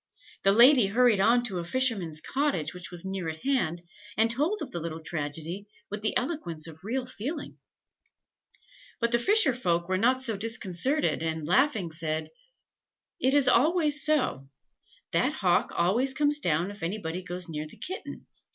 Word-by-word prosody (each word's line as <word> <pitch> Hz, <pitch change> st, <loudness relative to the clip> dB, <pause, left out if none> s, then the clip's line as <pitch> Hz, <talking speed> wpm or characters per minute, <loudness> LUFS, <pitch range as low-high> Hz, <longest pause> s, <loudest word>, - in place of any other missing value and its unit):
The 195 Hz, -, +4 dB
lady 240 Hz, +1 st, +6 dB
hurried 230 Hz, 0 st, +3 dB
on 235 Hz, +5 st, +4 dB
to 195 Hz, -7 st, -3 dB
a -, -, -3 dB
fisherman's 190 Hz, -7 st, 0 dB
cottage, 265 Hz, -, -1 dB
which 180 Hz, -1 st, -8 dB
was 175 Hz, 0 st, -4 dB
near 190 Hz, -3 st, -3 dB
at 160 Hz, 0 st, -8 dB
hand, 175 Hz, -, 0 dB, 0.3 s
and 225 Hz, +1 st, +3 dB
told 305 Hz, -, 0 dB
of 265 Hz, -, -8 dB
the 170 Hz, -, -4 dB
little 165 Hz, 0 st, -5 dB
tragedy 160 Hz, +5 st, -3 dB, 0.2 s
with 210 Hz, 0 st, -4 dB
the 215 Hz, -, 0 dB
eloquence 245 Hz, -, -2 dB
of 160 Hz, 0 st, -12 dB
real 250 Hz, +5 st, -2 dB
feeling. 280 Hz, +6 st, -6 dB, 1.4 s
"But 235 Hz, -1 st, 0 dB
the 235 Hz, -, +3 dB
fisher 410 Hz, -, +4 dB
folk 175 Hz, -8 st, 0 dB
were 185 Hz, 0 st, 0 dB
not 255 Hz, +4 st, +3 dB
so 240 Hz, -4 st, -1 dB
disconcerted, 225 Hz, -, +1 dB
and, 160 Hz, -1 st, -3 dB
laughing, 210 Hz, -, +2 dB
said 155 Hz, 0 st, -3 dB, 0.9 s
"'It 265 Hz, +2 st, +2 dB
is 285 Hz, -2 st, +3 dB
always 300 Hz, +2 st, +3 dB
so; 255 Hz, -, 0 dB, 0.6 s
that 175 Hz, -, +1 dB
hawk 180 Hz, -, +1 dB
always 235 Hz, +10 st, +2 dB
comes 295 Hz, +1 st, +2 dB
down 170 Hz, -, 0 dB
if 205 Hz, -, -12 dB
anybody 175 Hz, -1 st, -3 dB
goes 180 Hz, 0 st, -3 dB
near 155 Hz, -1 st, -5 dB
the -, -, -15 dB
kitten. 375 Hz, +2 st, -7 dB
205 Hz, 165 wpm, -28 LUFS, 170-260 Hz, 1.4 s, lady